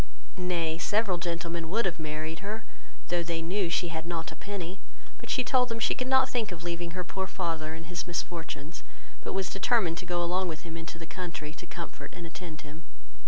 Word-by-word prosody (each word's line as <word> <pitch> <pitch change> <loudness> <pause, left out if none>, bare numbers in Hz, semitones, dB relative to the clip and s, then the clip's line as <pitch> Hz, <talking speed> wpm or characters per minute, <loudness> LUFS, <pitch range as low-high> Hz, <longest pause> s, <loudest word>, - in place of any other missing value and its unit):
Nay, 170 -3 +1
several 205 -1 +3
gentlemen 170 -1 -1
would 225 +5 +3
have 170 -3 +1
married 155 +1 -2
her, 215 +3 -3 0.4
though 175 -1 +3
they 170 -1 0
knew 180 +1 +2
she 170 +1 +3
had 160 0 -3
not 165 -2 -1
a - - -7
penny; 195 -2 -3 0.4
but - - -8
she 255 - +4
told 250 0 +5
them 230 - 0
she - - +5
could 255 - -1
not 265 0 +7
think 230 -6 +1
of 170 -1 -5
leaving 170 0 -2
her 180 - +1
poor 190 +1 -1
father 165 -4 -1
in 165 - -6
his 175 +2 -2
misfortunes, 165 -2 -2 0.4
but - - -2
was 190 -1 +1
determined 195 -5 +4
to 180 - -5
go 175 0 +2
along 180 +2 +2
with 160 -2 -3
him 165 -1 -6
into 165 0 -5
the 165 - -6
country 165 -4 -4
to - - -8
comfort 170 -1 -6
and 170 - -5
attend 165 -2 -6
him. 155 +2 -9
175 Hz, 210 wpm, -31 LUFS, 165-190 Hz, 0.4 s, not